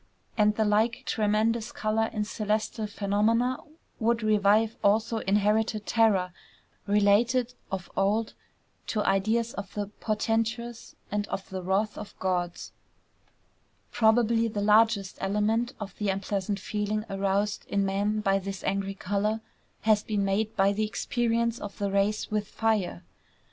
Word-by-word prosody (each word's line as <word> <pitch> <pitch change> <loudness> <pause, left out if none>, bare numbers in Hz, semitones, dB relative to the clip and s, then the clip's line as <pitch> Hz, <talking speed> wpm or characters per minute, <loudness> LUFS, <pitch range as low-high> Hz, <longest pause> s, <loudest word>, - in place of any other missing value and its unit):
And 210 -1 +3
the 220 - +1
like 220 +3 +1
tremendous 220 +2 +1
color 220 +1 0
in 210 - -1
celestial 215 +1 -2
phenomena 215 +5 +1 0.4
would 230 0 +1
revive 215 +1 +3
also 220 +3 +2
inherited 210 +1 +1
terror 200 -6 +2 0.5
related 225 +5 +3 0.2
of 190 -2 -4
old 210 +3 +1 0.5
to 215 -2 0
ideas 220 +5 +1
of 200 -1 -6
the 205 -1 -1
portentous 225 +2 -2 0.2
and 205 0 -1
of 195 - -5
the 190 -1 -4
wrath 195 +4 0
of - - -9
gods. 180 -2 -2 1.2
Probably 230 0 +3
the 210 -2 -3
largest 210 -1 +3
element 210 +4 0
of 210 -2 -7
the 210 -2 0
unpleasant 195 +1 -2
feeling 210 +2 -2
aroused 200 +1 -1
in 200 -1 +1
man 205 +2 0
by 195 -1 +2
this 195 0 -6
angry 195 0 -1
color 205 +3 -1 0.4
has 215 -1 +3
been 205 -2 -1
made 210 +3 0
by 195 +1 +3
the 215 +2 -1
experience 230 +2 0
of 205 - -7
the 200 -1 -1
race 200 +2 0
with 210 -1 -1
fire. 215 -6 -1
210 Hz, 135 wpm, -27 LUFS, 200-225 Hz, 1.2 s, And